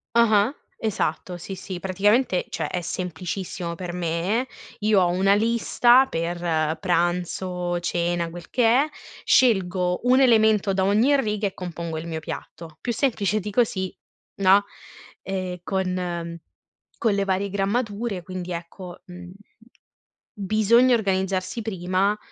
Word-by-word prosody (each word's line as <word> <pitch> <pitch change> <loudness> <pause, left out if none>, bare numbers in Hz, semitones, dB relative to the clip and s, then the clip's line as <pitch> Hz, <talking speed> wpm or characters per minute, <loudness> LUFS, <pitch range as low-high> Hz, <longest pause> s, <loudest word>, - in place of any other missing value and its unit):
Ah-ah, 220 +1 +4 0.2
esatto, 180 -4 -2
sì, 185 +3 -7
sì. 185 -1 -7
Praticamente, 195 +3 +1
cioè - - -3
è 180 - -2
semplicissimo 180 0 -4
per 180 -1 -5
me: 180 +8 -1 0.3
io 210 -2 +3
ho 175 - +3
una 195 +3 +3
lista 235 +3 +4
per 165 -3 -1
pranzo, 175 0 -1
cena, 170 0 -1
quel 170 0 -10
che 245 -2 +1
è, 265 +7 +4 0.4
scelgo 185 -6 +3
un 255 +1 +6
elemento 220 -5 +4
da 190 - +1
ogni 225 +9 +4
riga 210 -3 -1
e 190 - -4
compongo 170 -2 -5
il 165 +2 -6
mio 160 -1 -3
piatto, 160 0 -8
più 240 - -2
semplice 215 -5 0
di 210 0 -5
così, 195 -5 0 0.4
no. 195 +1 +5 0.6
Ehm, 185 -2 -4
con 180 -3 -3 0.6
con 220 -3 +2
le 200 0 +1
varie 195 +1 0
grammature, 205 0 -2
quindi 185 -1 -6
ecco, 175 +1 -8
mhmm, 180 0 -10 1.0
bisogna 220 +4 +3
organizzarsi 190 0 -1
prima, 195 0 0
190 Hz, 130 wpm, -24 LUFS, 175-215 Hz, 1.0 s, un